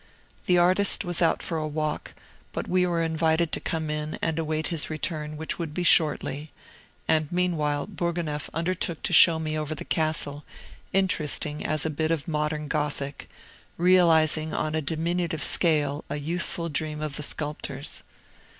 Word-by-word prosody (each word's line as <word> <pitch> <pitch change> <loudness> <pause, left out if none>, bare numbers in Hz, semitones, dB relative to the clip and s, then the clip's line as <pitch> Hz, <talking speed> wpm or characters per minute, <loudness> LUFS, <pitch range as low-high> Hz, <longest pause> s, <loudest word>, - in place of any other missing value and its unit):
The 180 - +4
artist 185 +3 +4
was 175 0 0
out 165 - +2
for 165 -2 -2
a 155 - -2
walk, 155 0 -3 0.4
but - - -4
we 180 0 +2
were 170 -1 0
invited 160 0 +1
to - - 0
come 160 -2 -3
in 150 0 -3
and 165 -1 -1
await 155 -1 -1
his 165 -3 -1
return, 155 -1 -3
which 160 +3 -4
would 160 -3 -4
be 180 - -1
shortly; 150 -3 +3 0.6
and 155 -2 +1
meanwhile 155 -5 0
Bourgonef 170 -6 -3
undertook 170 0 -2
to - - 0
show 165 0 +8
me 155 -1 -2
over 155 0 -3
the - - -7
castle, 155 -2 0 0.5
interesting 155 -5 +1
as 155 -1 0
a 160 - 0
bit 155 +1 -1
of 165 -3 -1
modern 150 -1 -1
Gothic, 145 -2 -3 0.5
realizing 165 -3 +4
on 155 - -1
a 160 - 0
diminutive 165 +1 -1
scale 150 -4 +2
a - - -2
youthful 170 +3 -2
dream 155 -1 -2
of 155 -2 -4
the - - -4
sculptor's. 145 -2 -3
155 Hz, 160 wpm, -26 LUFS, 150-170 Hz, 0.6 s, show